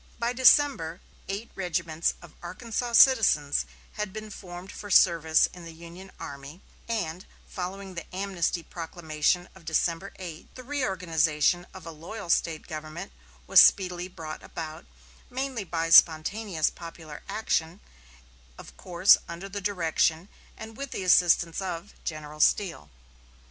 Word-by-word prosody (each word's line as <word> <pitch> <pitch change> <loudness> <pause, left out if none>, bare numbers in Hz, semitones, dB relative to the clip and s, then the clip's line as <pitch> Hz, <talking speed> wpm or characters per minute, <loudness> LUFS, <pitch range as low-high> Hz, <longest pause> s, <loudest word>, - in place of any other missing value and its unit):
By 235 +1 -1
December, 250 - +4 0.3
eight 200 +4 -5
regiments 170 -3 -1
of 170 - -14
Arkansas 230 +6 -4
citizens 215 - +5 0.3
had 210 -2 -3
been 215 +1 -8
formed 180 -1 -9
for 205 - -9
service 165 -4 +5
in 180 - -11
the 165 -1 -10
Union 170 +3 -12
army; 140 +5 -9 0.3
and, 185 -6 -3 0.2
following 190 +1 -6
the 170 -2 -7
amnesty 185 -3 -2
proclamation 165 +1 -2
of 190 - -17
December 165 +4 -1
8, 170 -4 -9
the 255 - -9
reorganization 175 - 0
of 185 -3 -12
a 165 - -7
loyal 170 +4 -6
State 160 -2 0
government 155 - -7 0.3
was - - +8
speedily 180 -2 +3
brought 160 -4 -8
about, 155 - -8 0.4
mainly 260 -3 -3
by 165 -2 -3
spontaneous 165 +2 +4
popular 165 -3 -10
action, 175 -5 -1 0.8
of - - -12
course 180 +2 +5
under 170 +3 -7
the 200 +1 -6
direction 170 -2 0 0.3
and 220 0 -10
with 275 0 -5
the 195 - -5
assistance 175 -1 +4
of 185 +1 -5
General 155 -1 -6
Steele. 165 - +1
175 Hz, 135 wpm, -27 LUFS, 160-200 Hz, 0.8 s, was